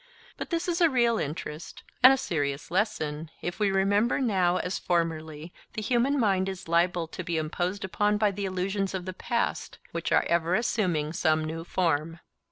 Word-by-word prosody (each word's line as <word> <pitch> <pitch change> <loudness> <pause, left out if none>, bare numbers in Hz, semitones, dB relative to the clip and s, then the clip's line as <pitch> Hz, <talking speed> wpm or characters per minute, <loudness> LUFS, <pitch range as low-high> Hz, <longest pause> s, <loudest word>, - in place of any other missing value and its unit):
But - - -6
this 335 0 -1
is 350 0 0
a 335 - +6
real 235 -4 +2
interest 150 +1 -6 0.2
and 255 +1 +10
a 270 - +3
serious 145 - -2
lesson, 160 -6 -1
if 175 +3 -4
we 205 -1 +3
remember 200 +4 +2
that 265 - +1
now 185 -5 +2
as 180 - -2
formerly 160 -2 -2 0.2
the 220 - -3
human 255 +5 +2
mind 195 -4 +2
is 190 -3 -7
liable 170 +1 +2
to 185 - -6
be 170 -1 -2
imposed 175 +5 -2
upon 205 +3 +1
by 210 -1 +2
the 200 +1 -4
illusions 190 +1 -2
of 180 -2 -4
the 185 - -4
past, 235 +5 -2
which - - -3
are - - +4
ever 170 +1 +2
assuming 175 -9 0
some 155 -1 +2
new 165 +1 -4
form. 165 -2 -1
185 Hz, 185 wpm, -27 LUFS, 165-210 Hz, 0.2 s, and